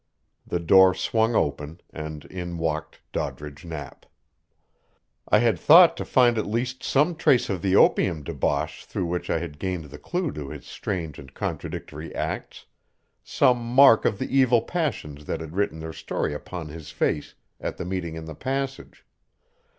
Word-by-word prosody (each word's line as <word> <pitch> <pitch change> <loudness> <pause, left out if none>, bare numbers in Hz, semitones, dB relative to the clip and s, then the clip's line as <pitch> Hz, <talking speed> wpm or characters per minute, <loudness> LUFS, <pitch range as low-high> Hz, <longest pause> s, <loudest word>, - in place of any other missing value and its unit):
The 85 - -1
door 95 +2 +6
swung 110 +5 +1
open, 75 +2 -1
and 75 -1 -7
in 85 -2 -6
walked 80 -1 -3
Doddridge 75 0 -5
Knapp. 75 -5 -8 1.2
I - - +6
had 110 -5 +2
thought 170 +2 +8
to - - -4
find 120 -3 +4
at - - -2
least 120 +4 -2
some 150 +6 +2
trace 130 -8 +3
of 95 -3 -3
the 95 0 +2
opium 85 -6 +4
debauch 75 0 -2
through 90 - -3
which 90 +1 -3
I - - +2
had 75 -4 -6
gained 90 -6 -4
the 75 - -10
clue 175 -4 -2
to 70 -2 -7
his - - -9
strange 80 -7 -4
and 65 -2 -12
contradictory 80 +3 -5
acts - - -4 0.6
some 125 -2 +2
mark 120 0 +6
of 100 - +1
the 135 - -3
evil 125 -4 +4
passions 110 - -3
that - - -3
had 80 +1 -8
written 100 -5 0
their 80 0 -6
story 75 - -3
upon 80 +2 -6
his 80 0 -9
face 75 -1 -1 0.2
at - - -4
the - - -5
meeting 90 -3 -3
in 80 -1 -7
the 80 - -7
passage. 135 - -4
90 Hz, 165 wpm, -25 LUFS, 80-120 Hz, 1.2 s, thought